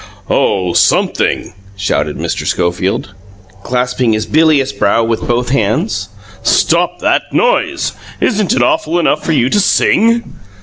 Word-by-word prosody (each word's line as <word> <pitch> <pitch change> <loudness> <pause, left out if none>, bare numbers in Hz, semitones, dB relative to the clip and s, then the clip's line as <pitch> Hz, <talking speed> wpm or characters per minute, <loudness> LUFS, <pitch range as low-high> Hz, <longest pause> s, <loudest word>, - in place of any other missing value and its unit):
"Oh 90 -4 +1
SOMETHING!" - - +1 0.2
shouted 100 0 -1
Mr. - - -3
Schofield, 90 +2 -1 0.5
clasping 125 0 0
his 110 0 -1
bilious 150 -4 +2
brow 115 +3 +1
with 115 -1 -2
both 120 +1 0
hands. 105 -5 -1 0.3
"Stop 175 +1 +1
that - - 0
noise! - - 0 0.3
Isn't 210 -3 0
it 250 - +2
awful 320 - 0
enough 160 -3 +1
for 165 - 0
you 125 -4 +2
to 205 - +3
SING? 230 +4 +2
125 Hz, 130 wpm, -14 LUFS, 105-175 Hz, 0.5 s, to